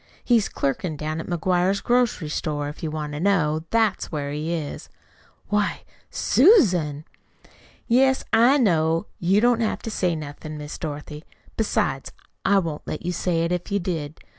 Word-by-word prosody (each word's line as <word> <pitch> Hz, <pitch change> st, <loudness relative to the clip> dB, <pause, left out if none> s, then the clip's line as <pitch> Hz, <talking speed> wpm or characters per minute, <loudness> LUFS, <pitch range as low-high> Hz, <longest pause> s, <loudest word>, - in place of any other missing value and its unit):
He's 235 Hz, -5 st, +3 dB
clerkin' 150 Hz, +4 st, -2 dB
down 155 Hz, +2 st, -3 dB
to -, -, -5 dB
McGuire's 180 Hz, +2 st, +1 dB
grocery 240 Hz, -10 st, +1 dB
store, 145 Hz, -1 st, -2 dB
if 150 Hz, -, -10 dB
you 160 Hz, -, -2 dB
want 150 Hz, -1 st, -4 dB
to 150 Hz, -, -4 dB
know. 160 Hz, -4 st, +1 dB
That's 225 Hz, -3 st, +1 dB
where 145 Hz, -3 st, -3 dB
he 150 Hz, +3 st, -3 dB
is." 160 Hz, -4 st, -4 dB, 0.6 s
"Why 210 Hz, 0 st, 0 dB, 0.3 s
SUSAN!" 180 Hz, -, +3 dB, 0.8 s
"Yes, 265 Hz, +2 st, +3 dB
I 240 Hz, +5 st, +6 dB
know. 165 Hz, -, +2 dB
You 190 Hz, +4 st, +3 dB
don't 240 Hz, 0 st, +3 dB
have 220 Hz, -, -1 dB
to 225 Hz, -, -4 dB
say 180 Hz, -5 st, 0 dB
nothin', 155 Hz, 0 st, -7 dB
Miss 150 Hz, 0 st, -7 dB
Dorothy. 150 Hz, 0 st, -6 dB, 0.3 s
Besides, 135 Hz, -11 st, -1 dB, 0.3 s
I 200 Hz, +1 st, +4 dB
wouldn't 165 Hz, -6 st, -2 dB
let 155 Hz, -, -5 dB
you 180 Hz, -, 0 dB
say 175 Hz, -1 st, 0 dB
it 170 Hz, -, -1 dB
if 180 Hz, +2 st, -3 dB
you 200 Hz, -, +2 dB
did. 160 Hz, -5 st, -4 dB
170 Hz, 165 wpm, -24 LUFS, 150-205 Hz, 0.8 s, I